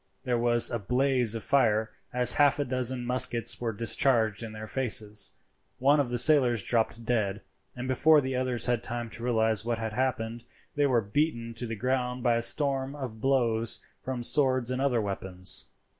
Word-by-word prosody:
There 125 -3 -1
was 120 0 +5
a 120 - -2
blaze 125 +1 +1
of 115 - -5
fire 110 -5 +1 0.2
as 125 0 +5
half 145 -2 +3
a 145 - -2
dozen 125 -1 0
muskets 120 -2 +1
were 115 -2 -2
discharged 115 0 +1
in 115 -2 -7
their 110 0 -8
faces. 105 -4 -1 0.4
One 140 +3 +3
of 140 -4 -1
the 120 - -2
sailors 120 -6 +4
dropped 115 0 -1
dead, 105 -4 -1 0.3
and 125 +1 -6
before 150 +4 +4
the 130 -2 -3
others 125 -2 -1
had 120 -2 -1
time 120 -1 -5
to 115 - -5
realize 110 -3 0
what 120 0 -2
had 110 -1 -5
happened 120 -2 -3 0.3
they 145 -1 +1
were 125 -4 +1
beaten 115 +1 -2
to 120 +1 -2
the 115 - -5
ground 125 +1 -2
by 120 -2 +2
a - - -1
storm 135 +3 +1
of 125 -6 -8
blows 115 -4 +1 0.2
from 130 -2 -5
swords 130 -2 +3
and 130 +1 -3
other 135 -4 +1
weapons. 95 -3 -3
120 Hz, 185 wpm, -27 LUFS, 115-130 Hz, 0.4 s, was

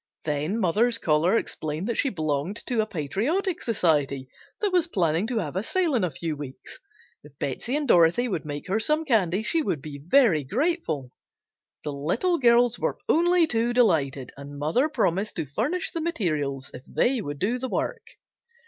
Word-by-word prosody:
Then 150 +7 -1
mother's 225 +5 +2
caller 165 +3 +2
explained 155 -1 -3
that 235 - 0
she 275 - +1
belonged 155 - -2
to 240 -3 +1
a 215 - -2
patriotic 250 - -1
society 145 - +1 0.3
that 415 -2 0
was 350 -2 +3
planning 175 - +1
to 245 -1 -2
have 170 -7 -3
a 190 - 0
sale 340 - 0
in 235 -6 +2
a 180 - +1
few 160 +2 -4
weeks. 140 -2 -9 0.4
If - - -17
Betsey 250 +3 -2
and 295 -1 -1
Dorothy 175 +5 +4
would 175 - -2
make 145 +2 -6
her 195 +4 +1
some 305 +7 +1
candy 210 - +2
she 325 +8 +2
would 165 - -1
be 145 0 -8
very 180 - +4
grateful. 165 - -1 0.7
The 150 - -3
little 205 - 0
girls 240 -1 +4
were - - -1
only 350 +1 +4
too 240 -4 0
delighted 145 - +2
and 140 +1 -9
mother 165 - +1
promised 210 - 0
to - - -2
furnish 240 - -2
the 335 - -3
materials 155 - -2
if 125 - -9
they 250 -1 +1
would 145 -4 -5
do 225 - 0
the 260 +1 -4
work. 470 - -3
200 Hz, 180 wpm, -25 LUFS, 150-255 Hz, 0.7 s, Dorothy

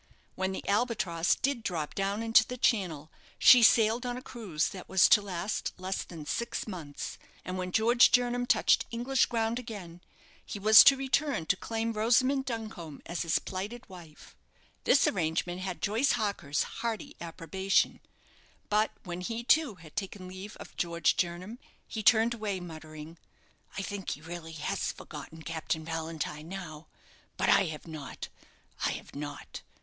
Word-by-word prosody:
When 190 0 -2
the 190 - -6
"Albatross" 200 -6 +1
did 275 -3 -1
drop 165 -8 -3
down 200 +3 -1
into 225 -1 +6
the 250 +3 -7
Channel, 175 - 0 0.3
she 250 - +8
sailed 225 +1 +5
on 245 0 -3
a - - -7
cruise 190 -11 -2
that 185 - -10
was 190 -1 +6
to 210 - +7
last 195 +1 -3
less 185 +1 -3
than 160 -4 -9
six 235 +9 -3
months; 165 -8 -6 0.3
and 185 - -4
when 185 0 -3
George 235 +4 +5
Jernam 245 0 +2
touched - - +3
English 245 +3 +1
ground 230 0 -1
again, 195 -8 -8 0.4
he - - -6
was 215 +2 +9
to 275 - +8
return 270 - 0
to 195 - +2
claim 225 +3 -3
Rosamond 255 +5 +2
Duncombe 220 - -6
as 170 - -4
his 165 -2 +2
plighted 205 +6 -6
wife. 170 -5 -13 0.5
This 280 - +5
arrangement 175 0 -1
had 185 -2 -5
Joyce 225 +7 +2
Harker's 200 -11 -1
hearty 235 +6 -5
approbation; 175 +3 0 0.7
but 215 +1 +3
when 175 -1 -5
he, 230 +5 -4
too, 290 -3 +3
had 160 -3 -15
taken 195 -2 -5
leave 190 +3 -9
of - - -11
George 170 -2 +1
Jernam, 185 +6 -3 0.3
he 220 - -4
turned 225 +2 +5
away 210 -4 -3
muttering, 155 -1 -10 0.6
"I 195 - -2
think 195 +1 -5
he 150 - -4
really 165 0 -8
has 155 - -2
forgotten 160 0 -10
Captain 160 -1 -3
Valentine 160 -1 -4
now; 170 -5 -8 0.5
but - - +1
I 195 - +5
have 155 -3 -6
not, 155 -4 -7 0.5
I - - +1
have - - -9
not. 145 0 -7
195 Hz, 160 wpm, -30 LUFS, 165-230 Hz, 0.7 s, was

